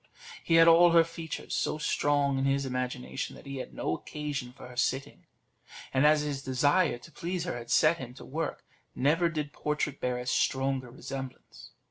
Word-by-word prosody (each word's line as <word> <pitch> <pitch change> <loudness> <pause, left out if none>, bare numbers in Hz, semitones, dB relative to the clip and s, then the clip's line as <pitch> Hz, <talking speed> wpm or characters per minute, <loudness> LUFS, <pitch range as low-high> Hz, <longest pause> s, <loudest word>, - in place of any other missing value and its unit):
He 165 - +2
had 165 0 +7
all 170 +1 +7
her 165 -1 +7
features 165 -1 -6
so - - 0
strong 145 -2 +1
in 135 - 0
his 140 0 +1
imagination, 125 +1 -3
that - - -14
he 140 0 -6
had 130 - -6
no - - -2
occasion 145 -4 -5
for 125 - -12
her 125 - -12
sitting; 130 +2 -2 0.7
and 135 +3 +5
as 150 0 +5
his 145 -2 -3
desire 145 +3 +2
to 165 - -15
please 175 +1 -3
her 175 - -3
had 120 -1 -8
set 155 +6 +4
him 125 -1 -8
to - - -11
work, 160 +4 -4 0.3
never 165 +6 +2
did 150 -3 -4
portrait 150 -2 -2
bear 125 -1 0
a 125 - -5
stronger 130 0 0
resemblance. 130 +1 -8
140 Hz, 185 wpm, -29 LUFS, 130-160 Hz, 0.7 s, had